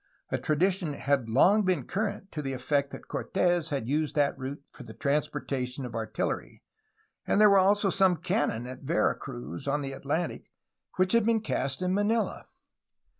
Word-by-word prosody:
A - - 0
tradition 175 +1 +1
had 140 -4 0
long 185 - +5
been 180 -9 0
current 200 -1 -3
to 150 - -4
the 135 -2 -3
effect 140 +2 0
that - - -10
Cortes 175 -3 0
had 135 -6 -2
used 150 +3 0
that 145 -2 +2
route 135 +1 -6
for - - -13
the - - -10
transportation 140 -3 -2
of 120 - -7
artillery, 110 -1 -3 0.6
and - - +2
there 210 -1 +7
were 200 - +6
also 200 +1 +3
some 190 -2 +3
cannon 160 - -1
at 130 +1 -8
Vera - - +1
Cruz, 75 - -7
on 145 +1 0
the 135 - -4
Atlantic, 150 +5 -3 0.5
which 185 +2 +2
had 230 -1 +5
been 230 0 +3
cast 140 -6 -2
in 180 0 +1
Manila. 210 +3 0
150 Hz, 175 wpm, -28 LUFS, 135-190 Hz, 0.6 s, there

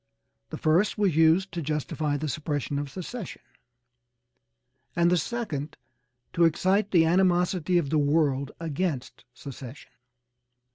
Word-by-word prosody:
The - - -6
first 170 +9 +2
was 200 -6 +1
used 165 +4 +4
to 170 0 -4
justify 150 0 -2
the 155 +2 -3
suppression 145 0 -2
of 145 -1 -4
secession, 190 - -7 1.5
and 170 0 +3
the - - +4
second 160 -8 -4 0.6
to 170 - +2
excite 190 +5 +2
the 165 -3 +4
animosity 180 0 +2
of 150 -5 0
the 155 - +3
world 145 -2 +1
against 155 -8 -3
secession. 135 -1 -10
160 Hz, 125 wpm, -26 LUFS, 145-180 Hz, 1.5 s, used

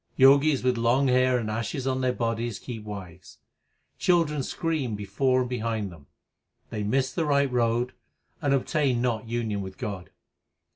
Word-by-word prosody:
Jogis 140 +1 +5
with 125 -2 +1
long 125 +4 +3
hair 130 0 +4
and 110 -3 -2
ashes 115 +4 -3
on 130 0 0
their 130 -1 +2
bodies 115 -2 -2
keep 115 -4 -7
wives. 95 -4 -9 0.3
] - - -47
Children 165 -5 +2
scream 140 -5 -2
before 125 +6 +1
and 125 - -2
behind 110 -4 -2
them. 75 -5 -15 0.6
They 105 - -3
miss 130 +6 0
the 165 - 0
right 140 -3 +2
road 120 0 +1 0.5
and 145 -3 +1
obtain 140 -1 +1
not 115 -3 -1
union 110 -3 -2
with 95 -1 -8
God. 100 -4 -5
125 Hz, 160 wpm, -26 LUFS, 110-135 Hz, 0.6 s, Jogis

